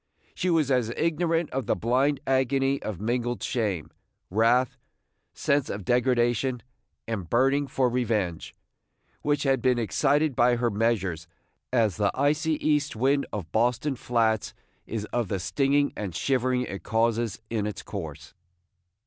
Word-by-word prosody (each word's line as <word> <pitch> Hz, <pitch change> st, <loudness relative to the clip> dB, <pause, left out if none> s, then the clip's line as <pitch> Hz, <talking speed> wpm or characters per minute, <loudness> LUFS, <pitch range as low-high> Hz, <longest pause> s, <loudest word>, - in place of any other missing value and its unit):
She 185 Hz, -, -1 dB
was 160 Hz, -5 st, +2 dB
as 125 Hz, -4 st, +2 dB
ignorant 165 Hz, 0 st, 0 dB
of 130 Hz, -3 st, -3 dB
the -, -, +2 dB
blind 130 Hz, +8 st, +1 dB
agony 135 Hz, +1 st, +1 dB
of 105 Hz, -5 st, -5 dB
mingled 120 Hz, +2 st, -1 dB
shame, 105 Hz, -, -2 dB, 0.4 s
wrath, 115 Hz, +4 st, +3 dB, 0.6 s
sense 140 Hz, -1 st, 0 dB
of 100 Hz, -2 st, -5 dB
degradation, 125 Hz, -1 st, +1 dB, 0.4 s
and 100 Hz, -8 st, -4 dB
burning 135 Hz, +4 st, +2 dB
for 130 Hz, -1 st, +1 dB
revenge, 110 Hz, -8 st, -1 dB, 0.7 s
which 145 Hz, 0 st, 0 dB
had 135 Hz, -3 st, +2 dB
been 125 Hz, 0 st, +3 dB
excited 145 Hz, +5 st, +1 dB
by 120 Hz, +1 st, +4 dB
her 120 Hz, 0 st, 0 dB
measures, 100 Hz, -6 st, 0 dB, 0.4 s
as 115 Hz, -7 st, +2 dB
the 100 Hz, -1 st, +2 dB
icy 150 Hz, +4 st, +1 dB
east 150 Hz, -2 st, +1 dB
wind 135 Hz, +5 st, +1 dB
of 90 Hz, -6 st, -5 dB
Boston 125 Hz, +6 st, +1 dB
flats 115 Hz, -3 st, 0 dB, 0.3 s
is 110 Hz, -2 st, -3 dB
of 120 Hz, -3 st, 0 dB
the 95 Hz, 0 st, -2 dB
stinging 140 Hz, +6 st, +1 dB
and 100 Hz, -5 st, -5 dB
shivering 130 Hz, -1 st, +1 dB
it 100 Hz, -5 st, -6 dB
causes 115 Hz, -1 st, 0 dB
in 105 Hz, -3 st, -1 dB
its 105 Hz, -2 st, -6 dB
course. 75 Hz, -7 st, -7 dB
120 Hz, 140 wpm, -26 LUFS, 110-135 Hz, 0.7 s, by